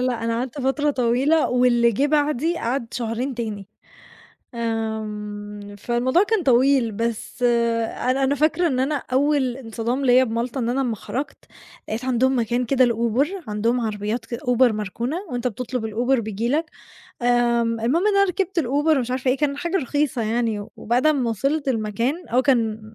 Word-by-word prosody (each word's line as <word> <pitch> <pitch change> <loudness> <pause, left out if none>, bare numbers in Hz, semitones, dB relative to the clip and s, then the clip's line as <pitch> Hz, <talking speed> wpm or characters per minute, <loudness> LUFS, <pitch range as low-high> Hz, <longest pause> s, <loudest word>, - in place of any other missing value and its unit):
لأ، 235 -2 -2
أنا 230 0 0
قعدت 260 +3 -4
فترة 290 +3 +1
طويلة 265 +5 +2
واللي 240 -2 +3
جِه 275 +7 +1
بعدي 300 +2 +1
قعد 240 0 -2
شهرين 240 +3 -2
تاني. 215 -4 -5 0.9
آمم، 210 -2 -4
فالموضوع 245 - +2
كان 420 -2 +1
طويل، 260 -3 +3
بس 230 +3 -4
أنا 235 +2 +1
أنا 280 +2 +2
فاكرة 310 +4 +2
إن 260 -5 0
أنا 275 +3 0 0.2
أول 265 -2 +2
انصدام 240 +2 -3
ليّا 255 +1 +5
بمالطة 235 +3 -3
إن 235 -1 -1
أنا 260 +3 0
أمّا 235 -4 -1
خرَجت 270 +8 -6 0.4
لقيت 225 +4 -3
عندهم 260 +1 +2
مكان 240 +2 0
كده 260 +1 +3
لUber، 235 +4 +1 0.2
عندهم 230 +4 0
عربيات 215 +1 -3
كد 235 - -4
Uber 250 0 +1
مركونة 215 - -3
وأنت 245 0 -1
بتطلب 245 0 -4
الUber 240 +4 +1
بييجي 220 +2 -3
لك، 310 +3 0 0.5
آمم 235 -1 +2
المهم 310 - +1
إن 410 - +2
أنا 395 - +5
ركبت 375 -1 -1
الUber 295 +3 +2
ومش 250 -1 -2
عارفة 255 0 0
إيه، 270 - 0
كان 280 -1 0
حاجة 345 +5 -1
رخيصة 285 -4 -1
يعني 225 -1 0
و 205 - -9
وبعد 245 +6 +1
أمّا 270 -6 +2
وصلت 275 +7 -1
المكان 235 - -1
أو 250 +2 +2
كان 225 -5 +1
245 Hz, 165 wpm, -22 LUFS, 230-275 Hz, 0.9 s, ليّا